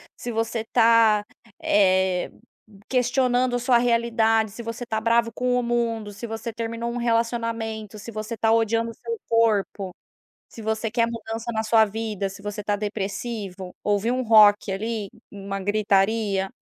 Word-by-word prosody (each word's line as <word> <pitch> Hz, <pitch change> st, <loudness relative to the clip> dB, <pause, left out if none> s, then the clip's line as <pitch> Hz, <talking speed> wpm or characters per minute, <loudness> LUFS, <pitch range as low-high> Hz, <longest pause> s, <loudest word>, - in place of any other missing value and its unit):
se 240 Hz, -, -6 dB
você 225 Hz, 0 st, -2 dB
tá, 225 Hz, -3 st, +5 dB, 0.4 s
eh, 190 Hz, -2 st, +2 dB, 0.6 s
questionando 250 Hz, 0 st, +2 dB
a -, -, -3 dB
sua 245 Hz, 0 st, +3 dB
realidade, 230 Hz, -2 st, +2 dB
se 235 Hz, +3 st, -8 dB
você 230 Hz, +1 st, -5 dB
tá 220 Hz, -2 st, -2 dB
bravo 230 Hz, 0 st, +2 dB
com 250 Hz, +1 st, 0 dB
o -, -, -2 dB
mundo, 230 Hz, -3 st, -1 dB
se 200 Hz, -, -7 dB
você 225 Hz, +1 st, -5 dB
terminou 230 Hz, +1 st, -4 dB
um 240 Hz, -, -4 dB
relacionamento, 230 Hz, -2 st, -2 dB
se 230 Hz, -, -8 dB
você 215 Hz, +2 st, -5 dB
tá 225 Hz, +1 st, +2 dB
odiando 230 Hz, 0 st, +1 dB
o -, -, -12 dB
seu 460 Hz, -, -5 dB
corpo, 210 Hz, -4 st, +1 dB, 0.6 s
se 225 Hz, -, -11 dB
você 220 Hz, +1 st, -2 dB
quer 230 Hz, 0 st, +2 dB
mudança 230 Hz, 0 st, -5 dB
na 220 Hz, 0 st, -1 dB
sua 220 Hz, 0 st, +4 dB
vida, 215 Hz, -2 st, -3 dB
se 195 Hz, +1 st, -11 dB
você 205 Hz, 0 st, -5 dB
tá 205 Hz, 0 st, 0 dB
depressivo, 200 Hz, -2 st, -5 dB
ouvir 205 Hz, +2 st, +1 dB
um 255 Hz, -, 0 dB
rock 210 Hz, -3 st, +5 dB
ali, 215 Hz, +1 st, -3 dB, 0.2 s
uma 195 Hz, -1 st, -6 dB
gritaria 200 Hz, 0 st, +1 dB
225 Hz, 160 wpm, -24 LUFS, 205-235 Hz, 0.6 s, tá